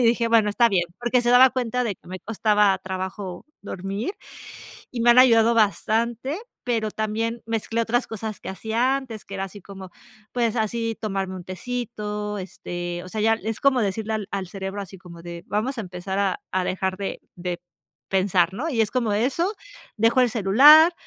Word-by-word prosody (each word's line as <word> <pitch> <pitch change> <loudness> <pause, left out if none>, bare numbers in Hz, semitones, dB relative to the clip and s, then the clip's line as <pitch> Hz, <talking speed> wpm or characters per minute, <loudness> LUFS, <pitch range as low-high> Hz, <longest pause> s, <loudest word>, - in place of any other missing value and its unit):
dije: 235 -1 +3
"Bueno, 225 -2 +4
está 235 +3 +4
bien", 180 -3 +2
porque 240 +1 +2
se 240 - 0
daba 255 +1 +8
cuenta 250 0 -1
de 210 - -1
que - - -19
me 185 +1 -6
costaba 210 -2 +2
trabajo 190 0 -5 0.2
dormir, 200 - -4 0.8
y 240 -2 -3
me 240 - +6
han 245 - +7
ayudado 235 -2 +6
bastante, 230 - +1 0.2
pero 225 -3 -1
también 225 +2 -2
mezclé 225 0 -1
otras 240 +2 +1
cosas 220 -1 -5
que - - -6
hacía 230 +7 0
antes, 240 -6 -8
que - - -10
era 195 0 -2
así 205 +2 -11
como, 190 0 -10 0.4
pues, 235 -2 +1
así 225 0 -1
tomarme 195 -3 -2
un 180 - -8
tecito, 210 -1 -4
este, 175 -1 -5
o 185 - -10
sea, 215 +1 -3
ya 225 +1 +4
es 220 +1 -4
como 265 -3 +4
decirle 220 +2 -2
al 210 -3 -3
al 195 -2 -3
cerebro 195 +2 -5
así 190 0 -9
como 170 -2 -12
de 170 0 -8
vamos 220 +6 -1
a - - 0
empezar 185 +1 -4
a 195 -2 0
a 185 -1 +1
dejar 190 0 -1
de 195 0 -4 0.2
de 175 -1 -4 0.5
pensar, 185 -2 +2
¿no? 305 +10 -2
Y 235 -7 +1
es 215 - +1
como 235 -4 0
eso, 275 - 0 0.4
dejo 230 +4 +4
el 245 - +3
celular 285 - +7
215 Hz, 190 wpm, -24 LUFS, 190-235 Hz, 0.8 s, daba